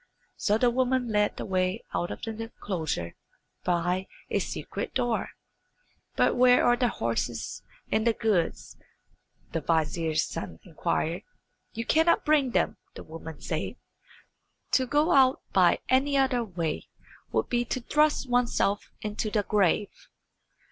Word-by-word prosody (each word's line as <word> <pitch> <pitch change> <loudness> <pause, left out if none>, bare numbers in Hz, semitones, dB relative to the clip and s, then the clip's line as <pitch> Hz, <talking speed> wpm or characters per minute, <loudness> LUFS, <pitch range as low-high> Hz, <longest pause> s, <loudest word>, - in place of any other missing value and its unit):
So 210 +1 +1
the 240 +1 +3
woman 255 0 +1
led 210 -1 +1
the - - -4
way 185 +2 0
out 175 - -1
of - - -7
the 225 - -3
enclosure 185 - -4 0.5
by 180 +1 0 0.2
a - - +2
secret - - -5
door. 240 -2 0 0.9
"But - - +3
where 250 0 +5
are 240 - +5
the 245 0 +2
horses 115 - -2 0.3
and 220 +2 +2
the 230 - +4
goods?" 210 -8 -1 0.7
the 165 - -2
vizier's 160 0 +1
son - - -6
inquired. - - -2 0.5
"You 230 +1 -4
cannot 320 +5 +3
bring 300 -4 +3
them," - - 0 0.2
the - - -8
woman 160 0 -9
said. - - -3 1.0
"To 260 -1 +3
go 295 +6 +2
out 265 -3 +4
by 180 -3 +5
any 275 +2 +3
other 260 -3 +2
way 170 -7 -3 0.4
would - - 0
be 240 0 +1
to 255 - -2
thrust 300 +2 +2
oneself 245 -4 +1
into 210 0 -2
the 210 -1 +1
grave." 205 0 +2
220 Hz, 140 wpm, -28 LUFS, 175-250 Hz, 1.0 s, where